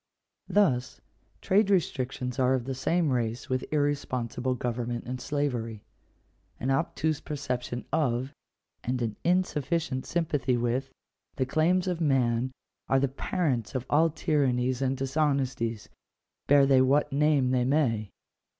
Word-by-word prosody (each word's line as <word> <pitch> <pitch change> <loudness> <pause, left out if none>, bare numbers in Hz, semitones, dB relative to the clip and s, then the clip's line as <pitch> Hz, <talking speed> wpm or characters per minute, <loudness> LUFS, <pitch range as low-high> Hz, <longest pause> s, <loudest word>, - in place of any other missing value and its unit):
Thus, 130 -12 +1 0.4
trade 200 +2 +3
restrictions 130 -9 -1
are 130 0 +3
of 125 -2 -3
the 135 - -3
same 160 +4 +1
race 120 -1 -2
with 130 0 0
irrespon 145 -5 0
sible 130 0 -1
government 120 0 -3
and 125 +1 -5
slavery. 120 -7 -2 0.8
An 130 - -1
obtuse 160 +1 0
perception 125 -4 -4
of, 130 -3 0 0.5
and 125 +1 -1
an 110 -2 -2
insufficient 165 -5 0
sympathy 145 -7 0
with, 120 +3 -1 0.5
the 130 - 0
claims 170 +7 +2
of 175 -2 -1
man, 130 -4 +2 0.4
are 135 - +3
the 140 - +2
parents 135 - -2
of 130 -1 -2
all 160 +3 +5
tyrannies 130 -5 0
and 135 0 0
dishonesties, 135 -5 -1 0.6
bear 140 -1 +6
they 135 -1 +5
what 135 +2 +2
name 145 -3 +3
they 125 -1 +2
may. 120 -6 +1
130 Hz, 130 wpm, -28 LUFS, 125-150 Hz, 0.8 s, bear